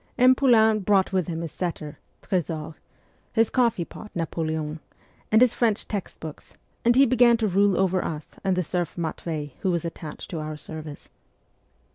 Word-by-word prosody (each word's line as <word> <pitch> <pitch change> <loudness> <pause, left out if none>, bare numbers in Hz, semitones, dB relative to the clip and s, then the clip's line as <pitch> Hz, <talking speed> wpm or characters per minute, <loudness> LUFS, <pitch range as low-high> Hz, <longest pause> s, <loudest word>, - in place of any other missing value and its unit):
M. 255 0 +7
Poulain 220 -5 +4
brought 195 -1 +2
with 185 -3 +1
him 165 -1 -3
his 165 -3 -5
setter, 160 -4 -5 0.2
Tresor, 160 -3 -2 0.6
his 225 -1 +3
coffee 230 -8 +2
pot 210 - -11
Napoleon, 160 -2 -2 0.5
and 220 +3 +7
his 250 - +3
French 225 -4 0
text 200 -3 -5
books, 155 -2 -10 0.3
and 240 +1 +4
he 275 +2 +7
began 240 -1 +5
to 220 -1 0
rule 200 0 +3
over 185 -1 +2
us 150 -2 -5
and 190 -1 +1
the 180 - 0
serf 175 0 -2
Matvei 160 -2 -4
who 190 - 0
was 170 -2 0
attached 160 -2 -7
to 165 - -3
our 155 0 -5
service. 155 -1 -9
180 Hz, 170 wpm, -25 LUFS, 160-220 Hz, 0.6 s, M